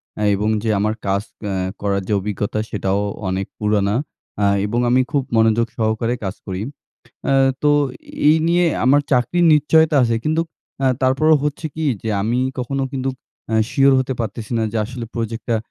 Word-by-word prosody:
অ্যা 105 - -3
এবং 105 +2 -1
যে 115 - -1
আমার 105 +1 +1
কাজ 100 +1 +1 0.2
অ্যা 100 - -2 0.3
করার 100 -1 0
যে - - 0
অভিজ্ঞতা, 105 +1 -3
সেটাও 100 -1 -1 0.3
অনেক 95 +1 -1
পুরানা। 105 -1 +1 0.5
আ - - +4 0.2
এবং 115 +4 -1
আমি 125 +2 +4
খুব 140 -3 +1
মনোযোগ 115 +1 +3
সহকারে 115 +1 0
কাজ 95 0 -3
করি। 95 0 -4 0.6
অ্যা 135 - +2 0.3
তো 150 - +4 0.6
এই 155 - +6
নিয়ে 175 +1 +3 0.2
আমার 145 +3 +5
চাকরির 135 +8 +2
নিশ্চয়তা 155 +1 +4
আছে 115 -1 +1
কিন্তুক 160 +2 0 0.4
আ 135 - +4
তারপরেও 145 +5 +4
হচ্ছে 150 +2 -2
কী, 160 - -3 0.2
যে 110 - -3
আমি 115 +4 0 0.2
কখনো 135 +2 -2
কিন্তু 135 -1 -2 0.4
অ্যা 110 - +1
শিওর 135 0 +4
হতে 130 0 -1
পারতেসি 115 0 -5
না 115 - +1
যে 115 - -2
আসলে 120 0 -6
প্রোজেক্টটা 115 0 -2
115 Hz, 170 wpm, -20 LUFS, 105-135 Hz, 0.6 s, এই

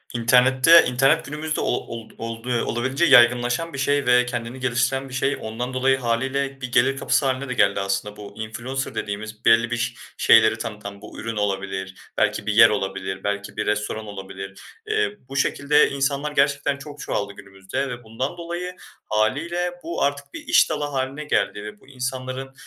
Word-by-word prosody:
İnternette 130 +7 +6
İnternet 130 +2 +3
günümüzde 150 +2 -3
ol - - +1
old 115 -1 -8
oldu 115 +1 -3
olabildiğince 130 +7 0
yaygınlaşan 120 +4 +4
bir 140 - -5
şey 145 +1 +1
ve 125 0 +5
kendini 120 +1 -5
geliştiren 130 +2 0
bir - - -11
şey. 135 +2 0
Ondan 120 +4 -4
dolayı 130 +1 +2
hâliyle 135 +3 -1
bir 125 -1 -5
gelir 130 +3 +3
kapısı 135 - +1
hâline 130 0 -1
de - - -1
geldi 100 -5 +2
aslında. 100 +1 -2
Bu, 105 -1 -10
"influencer" 120 +5 -4
dediğimiz, 110 +1 -5
belli 115 +1 +5
bir 120 - 0
ş 120 0 -1 0.2
şeyleri 110 0 +5
tanıtan, 105 -3 -7
bu, - - -11
ürün 115 0 -4
olabilir, 95 -2 -2 0.2
belki - - +1
bir 110 - 0
yer 115 +1 +8
olabilir, 95 -2 -3
belki 100 0 -3
bir 105 - -1
restoran 105 +1 -2
olabilir. 95 -1 -8 0.3
Eee, 430 - 0
bu 135 - -8
şekilde 145 +2 +3
insanlar 140 +2 -1
gerçekten 140 0 +1
çok 145 +1 -11
çoğaldı 100 -5 -3
günümüzde 100 +7 -5
ve 120 -1 -7
bundan 130 +9 -4
dolayı 175 +1 -5 0.3
hâliyle 165 +12 0
bu, 170 0 -2
artık 140 0 -2
bir - - -6
iş - - +5
dalı 150 -2 -2
hâline 140 0 -3
geldi 105 -7 0
ve 105 0 -9
bu - - -22
insanların 130 0 -5
125 Hz, 175 wpm, -23 LUFS, 110-140 Hz, 0.3 s, yer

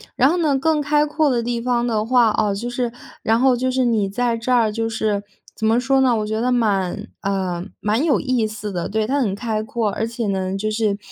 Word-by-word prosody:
然 265 +3 +4
后 350 - +1
呢 300 -5 +2
更 310 +2 +1
开 295 +1 +2
阔 300 0 +1
的 240 -2 0
地 240 0 -2
方 240 -1 0
的 220 -2 0
话 240 -2 +4
啊， 210 -1 +1
就 235 +5 -4
是 245 -1 -2 0.3
然 225 +1 +2
后 260 -1 +4
就 255 +1 0
是 255 -1 +1
你 220 -4 +1
在 235 +2 0
这 235 +3 -3
儿， 225 -3 +3
就 225 +1 -2
是 215 -2 -1 0.3
怎 220 - -1
么 230 +2 +3
说 270 +2 +2
呢， 250 -3 +3
我 210 - -1
觉 220 +1 -2
得 250 +2 +1
蛮， 210 -3 0
呃， 185 -3 -2 0.2
蛮 215 +7 +1
有 300 - +3
意 250 -4 0
思 210 -1 -6
的。 175 -2 -3
对， 215 +1 -1
它 275 +5 0
很 205 -7 0
开 215 -1 -2
阔， 220 -1 -2
而 225 +3 -2
且 230 -1 -3
呢 190 -1 -1
就 215 +2 -2
是， 215 -2 0
230 Hz, 260 characters per minute, -21 LUFS, 210-250 Hz, 0.3 s, 然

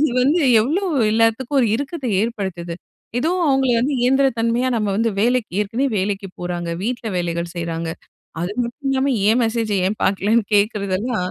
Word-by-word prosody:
இது 305 -3 +3
வந்து 300 +7 +3 0.2
எவ்ளோ 310 - 0 0.3
எல்லாத்துக்கும் 230 +5 +2
ஒரு 240 - +3
இருக்கத்த 280 +2 -4
ஏற்படுத்துது? 190 -7 -3 0.4
ஏதோ 310 +7 +1 0.2
அவங்கள 265 -2 +2
வந்து 270 +5 0
இயந்திரத் 265 -1 +2
தன்மையா, 235 +3 +1
நம்ம 210 -2 0
வந்து 225 +1 +1
வேலைக்கு 240 -1 +1
ஏற்கனவே 230 +7 0
வேலைக்கு 195 0 -2
போறாங்க. 175 -1 -3
வீட்ல 240 -1 -3
வேலைகள் 170 -1 -2
செய்றாங்க. 165 -1 -3 0.5
அது 175 +4 -2
மட்டும் 270 +4 -5
இல்லாம 270 0 +1 0.2
ஏன் 230 +3 +4
மெசேஜை 225 -2 0
ஏன் 210 +2 -2
பாக்கலன்னு 205 +4 +2
கேட்கிறதெல்லாம் 205 -1 0
225 Hz, 155 wpm, -20 LUFS, 195-255 Hz, 0.5 s, ஏன்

